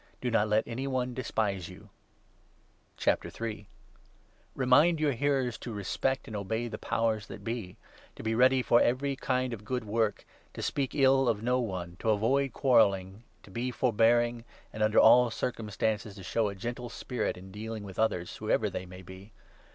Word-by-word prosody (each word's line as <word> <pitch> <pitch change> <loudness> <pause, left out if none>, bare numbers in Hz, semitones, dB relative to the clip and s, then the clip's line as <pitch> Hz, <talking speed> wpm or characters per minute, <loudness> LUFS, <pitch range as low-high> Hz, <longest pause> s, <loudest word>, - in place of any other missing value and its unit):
Do 125 - -2
not 110 -2 +3
let 105 +1 +1
any 125 +3 -4
one 130 -2 -1
despise 105 -7 -2
Teaching. 100 +2 -13 1.3
vou 110 -2 -6 0.9
Remind 145 +6 +4
your 150 -2 +2
hearers 135 -1 0
to 120 - -6
respect 110 +6 -2
and 110 - -7
i - - -2
obey 110 +4 -2
the 110 - -6
Powers 110 -2 -1
that 100 - -9
be, 115 -5 -5 0.4
to - - -9
be 110 0 0
ready 130 +2 +4
for 120 - +4
every 135 +3 +1
kind 130 -1 -1
of 105 -2 -7
good 125 +3 -2
work, 110 0 -1 0.3
to - - -5
speak 140 -1 -2
ill 135 -2 +4
of 110 -1 -1
no 125 +2 +2
one, 90 -7 -4
to 110 - -1
avoid 130 +6 +2
quarrelling, 100 -5 +2 0.2
to 100 - -15
be 120 +5 -2
forbearing, 120 0 +2
2 - - -15 0.3
and 110 - -6
under 110 0 +2
all 120 +2 +7
circumstances 110 -2 -2
to 95 - -10
show 105 +6 0
a 100 - -7
gentle 120 +4 -5
spirit 120 0 -3
in 95 +1 -11
dealing 110 +1 -6
with 95 -2 -9
others, 90 -6 0
whoever 110 -1 0
they 95 0 -5
may 90 +1 -11
be. 95 +4 -12
115 Hz, 180 wpm, -29 LUFS, 105-125 Hz, 1.3 s, all